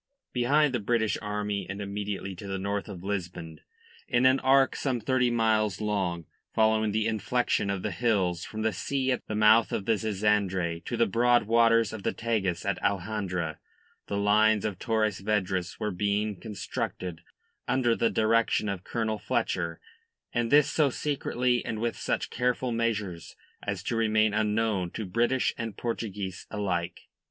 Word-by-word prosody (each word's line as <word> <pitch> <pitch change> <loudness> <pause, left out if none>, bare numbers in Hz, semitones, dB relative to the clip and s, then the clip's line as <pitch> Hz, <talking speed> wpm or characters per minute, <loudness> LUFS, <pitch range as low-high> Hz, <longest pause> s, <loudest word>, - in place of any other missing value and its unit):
Behind 140 +4 +3
the 120 - +1
British 110 0 +1
army 105 -2 -3
and 100 +1 -5
immediately 100 -1 -4
to 100 +3 -9
the 95 0 -2
north 100 +1 -2
of 90 -3 -8
Lisbon, 85 -5 -4 0.5
in 120 +1 +2
an 130 +1 +5
arc 135 0 +4
some 130 -4 -1
thirty 125 +2 +2
miles 110 -4 +1
long, 95 -6 -1 0.3
following 110 -1 +3
the 110 +1 0
inflection 110 -1 0
of 100 -2 -2
the 105 - -1
hills 90 -3 0
from 110 0 -5
the 110 -1 +1
sea 130 +7 -1
at 125 - -1
the 110 - -3
mouth 110 +1 +5
of 100 - -2
the 115 - +3
Zizandre 100 -5 0
to 120 - -3
the 115 - +4
broad 120 +4 +3
waters 115 0 +3
of 110 - -6
the - - -1
Tagus 100 -7 -1
at 100 -2 -1
Alhandra, 95 -5 -2 0.5
the 100 - -2
lines 105 +1 +3
of 100 -4 -3
Torres 110 -4 0
Vedras 95 -4 -1
were 105 -1 -1
being 105 +2 0
constructed 90 -5 -5 0.5
under 120 -3 +2
the 115 - +2
direction 110 -1 +2
of 95 -2 -4
Colonel 110 -2 -2
Fletcher 85 -3 -1 0.5
and 120 -1 0
this 150 0 +6
so 150 -3 +2
secretly 125 -3 0
and 110 - -3
with 115 +1 -1
such - - -2
careful 125 0 0
measures 105 -7 -2 0.3
as - - -4
to - - -2
remain 110 -1 +2
unknown 105 -3 +1
to 110 - -4
British 120 +6 +1
and 115 -2 -4
Portuguese 105 -5 -4
alike. 95 -5 -2
110 Hz, 165 wpm, -28 LUFS, 100-115 Hz, 0.5 s, this